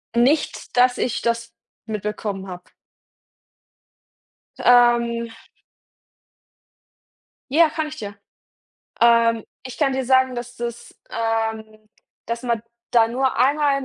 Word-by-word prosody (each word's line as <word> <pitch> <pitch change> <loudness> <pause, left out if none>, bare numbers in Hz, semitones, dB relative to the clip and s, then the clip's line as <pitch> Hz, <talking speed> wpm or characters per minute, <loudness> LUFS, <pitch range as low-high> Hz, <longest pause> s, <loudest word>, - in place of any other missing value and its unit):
Nicht, 255 +1 +1
dass 250 0 +4
ich 245 - -1
das 235 0 -2 0.3
mitbekommen 210 -2 -4
habe. 180 -1 -8 2.0
Ähm. 235 -1 +4 2.2
Ja, 320 +1 +5
kann 310 0 -3
ich 310 0 -9
dir 205 -2 -7 0.8
Ähm, 230 -1 +4 0.2
ich 255 - -8
kann 275 -3 +1
dir 265 -1 -1
sagen, 260 0 +3
dass 245 +1 -7
das 235 0 -6 0.2
ähm, 220 -1 -3 0.4
dass 235 +1 -4
man 235 -3 -1 0.3
da 230 -1 +5
nur 260 +2 0
einmal 280 +1 +2
in 270 - -6
235 Hz, 110 wpm, -22 LUFS, 225-260 Hz, 2.2 s, Ja